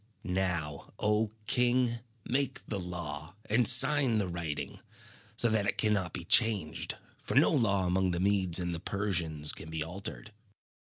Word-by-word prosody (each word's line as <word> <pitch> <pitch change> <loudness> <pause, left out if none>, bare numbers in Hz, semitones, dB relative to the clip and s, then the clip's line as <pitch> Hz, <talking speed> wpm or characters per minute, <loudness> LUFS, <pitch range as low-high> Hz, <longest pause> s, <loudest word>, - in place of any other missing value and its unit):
Now, 90 -6 -4
O 105 +1 0 0.2
king, 120 0 +1 0.3
make 135 +1 -2
the 105 - -4
law, 90 -2 -7
and 115 +2 +2
sign 125 0 +7
the 100 -3 -1
writing, 80 -5 -6 0.6
so 120 - +5
that 110 -2 0
it - - -2
cannot 105 -5 0
be 90 - -7
changed, 105 -8 +2 0.3
for - - -5
no - - +4
law 100 -5 +1
among 95 +1 0
the 85 -1 -3
Medes 95 -3 +2
and 90 -1 -3
the 85 - -5
Persians 85 -6 -2
can 80 - -9
be 80 -1 -4
altered." 100 +5 -7
95 Hz, 155 wpm, -29 LUFS, 85-110 Hz, 0.6 s, sign